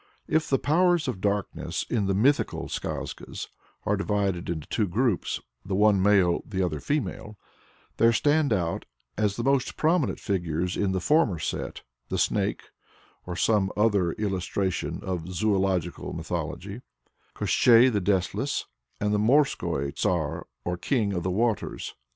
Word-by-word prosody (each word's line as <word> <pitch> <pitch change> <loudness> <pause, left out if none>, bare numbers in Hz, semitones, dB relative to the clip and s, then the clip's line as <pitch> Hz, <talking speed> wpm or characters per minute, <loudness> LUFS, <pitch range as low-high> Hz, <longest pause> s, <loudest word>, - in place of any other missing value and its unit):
If 160 0 +1
the 135 - +3
powers 175 +2 +2
of 110 -8 -3
darkness 100 0 -2
in 105 -5 0
the 95 - +1
"mythical" 135 +8 +2
skazkas - - -5 0.4
are 105 - +2
divided 100 -3 -1
into 80 -3 -3
two 105 -3 0
groups 110 +2 0 0.2
the 95 0 -2
one 105 -1 +4
male, 95 -3 +4
the 95 -3 -2
other 75 -4 -3
female 115 - -3 0.6
there 115 0 +5
stand 145 +4 +2
out 85 -5 0 0.3
as 105 -1 0
the 115 - -3
most 135 -1 +1
prominent 160 -2 +1
figures 90 -3 -1
in 100 -2 0
the 95 - 0
former 145 - +3
set, 80 - -4 0.3
the - - -1
Snake - - 0 0.6
(or 90 - -4
some 100 0 +2
other 100 -6 +2
illustration 95 -2 -2
of 90 -1 -4
"Zoological 95 -2 0
Mythology"), - - -4 0.5
Koshchei 120 +1 +5
the 105 - +1
Deathless, 95 -1 0 0.3
and 105 0 0
the 105 - +2
Morskoi 110 - +2
Tsar - - -1 0.2
or 90 0 -1
King 105 0 0
of 90 - -1
the 90 - -1
Waters. 110 +3 -1
100 Hz, 145 wpm, -26 LUFS, 95-120 Hz, 0.6 s, there